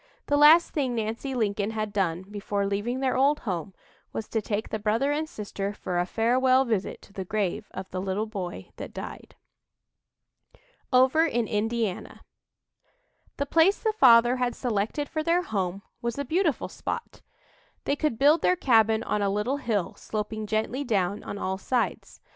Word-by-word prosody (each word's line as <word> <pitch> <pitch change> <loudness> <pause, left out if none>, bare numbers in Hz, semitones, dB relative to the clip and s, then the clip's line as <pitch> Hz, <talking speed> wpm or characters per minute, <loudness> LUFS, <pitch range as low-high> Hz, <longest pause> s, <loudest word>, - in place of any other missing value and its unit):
The 290 - +1
last 305 +4 +7
thing 265 -5 -1
Nancy 230 +4 -3
Lincoln 205 -3 0
had 215 -2 -3
done 180 -3 0
before 200 0 -3
leaving 205 +6 -2
their 260 -1 +1
old 280 +3 +3
home 190 -2 -4 0.4
was 220 - -5
to 220 - 0
take 210 +1 -3
the 220 - -3
brother 225 +7 +1
and 310 +2 -1
sister 200 -1 -4
for 180 -3 -3
a 175 - 0
farewell 255 +4 +3
visit 220 -5 -2
to 200 - -18
the 190 - -4
grave 210 +1 -2
of 190 0 -7
"the 185 - -3
little 195 +3 -1
boy 195 -5 -6
that - - -8
died." - - -8 1.6
OVER 265 +6 +5
IN 240 -6 0
INDIANA 220 -2 -2 1.2
The 280 - -1
place 330 +7 +4
the 440 -2 -1
father 240 - +6
had 250 -1 -1
selected 235 +4 -1
for 310 - -2
their 340 +3 +2
home 195 - -3 0.2
was 235 +1 -3
a 280 - -2
beautiful 320 0 0
spot. 470 - -6 0.6
They 280 - 0
could 295 -6 -1
build 295 +5 +5
their 365 - +3
cabin 225 - +3
on 210 - -1
a 200 - +1
little 210 +8 0
hill, 215 -9 -1
sloping 215 0 -4
gently 220 +6 -1
down 200 -5 0
on 205 - -6
all 190 -1 -3
sides. 245 +3 -2
225 Hz, 170 wpm, -27 LUFS, 205-270 Hz, 1.6 s, last